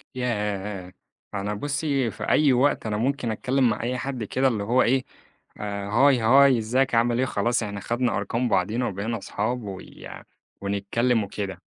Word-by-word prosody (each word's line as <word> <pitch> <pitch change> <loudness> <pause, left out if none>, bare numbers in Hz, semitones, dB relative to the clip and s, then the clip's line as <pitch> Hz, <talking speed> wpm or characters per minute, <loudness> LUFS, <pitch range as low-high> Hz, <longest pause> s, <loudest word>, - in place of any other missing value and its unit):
ياه! 105 -6 -3 0.4
أنا 100 +1 -2
بُصِّي 140 0 -1
في - - -8
أي 145 -4 +4
وقت 130 -1 +2
أنا 105 -1 -1
ممكن 125 -1 -1
أتكلّم 130 +3 +1
مع 105 - -2
أي 125 +1 -1
حد 130 -2 -4
كده 130 +5 +1
اللي 110 -5 0
هو 120 +5 +3
إيه 130 +2 +2 0.5
"هاي، 105 +6 +2
هاي 135 +2 +6
إزيك، 120 +3 +1
عامل 120 +1 +2
إيه؟" 130 - +2
خلاص 120 +1 0
إحنا 100 -1 -5
خدنا 120 -2 -1
أرقام 115 +5 -1
بعضينا 120 +4 +1
وبقينا 105 +4 -3
أصحاب 110 +4 -3
ويع 95 -2 -9 0.4
ونتكلّم 105 +4 0
وكده، 95 -3 -5
115 Hz, 160 wpm, -25 LUFS, 105-125 Hz, 0.5 s, هاي